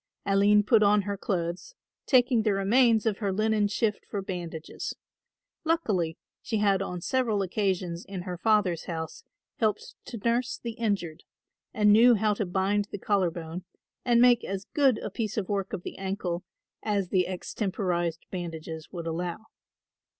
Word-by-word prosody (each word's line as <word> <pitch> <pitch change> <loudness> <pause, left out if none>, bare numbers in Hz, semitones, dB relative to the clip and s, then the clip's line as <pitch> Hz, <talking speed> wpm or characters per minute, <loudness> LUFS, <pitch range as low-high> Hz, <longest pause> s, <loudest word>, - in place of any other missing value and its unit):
Aline 200 +1 +4
put 220 +1 +4
on 205 0 +4
her 200 +1 -2
clothes, 185 - -3 0.3
taking 250 -3 +4
the 215 -2 +2
remains 225 +3 +4
of 215 -3 0
her 200 -3 0
linen 215 +1 +2
shift 210 0 -1
for 200 -2 -3
bandages. 170 -4 -5 0.7
Luckily 210 - 0 0.2
she 220 - -2
had 200 -2 +3
on 180 -2 -4
several 230 -3 +1
occasions 185 -3 -1
in 190 -2 -6
her 180 -1 -4
father's 190 -3 +2
house 160 -2 -5 0.3
helped 215 -2 -1
to 235 - -7
nurse 235 +3 0
the 235 - -5
injured 200 -8 -2 0.5
and 210 -1 +4
knew 235 +3 +7
how 215 0 +2
to 205 -1 -2
bind 195 +3 +1
the 205 - -7
collar 195 -2 +1
bone 170 +1 -7 0.4
and 240 -2 +4
make 245 -1 +6
as 195 0 -4
good 270 -6 +4
a - - -5
piece 215 +1 -3
of 200 -4 -2
work 195 -2 -1
of 190 -4 -4
the - - -7
ankle 190 -2 -3 0.4
as 200 -4 -1
the 185 -1 +2
extemporised 180 -3 -2
bandages 160 -3 -6
would 170 -3 -6
allow. 175 +5 -3
200 Hz, 160 wpm, -28 LUFS, 180-220 Hz, 0.7 s, knew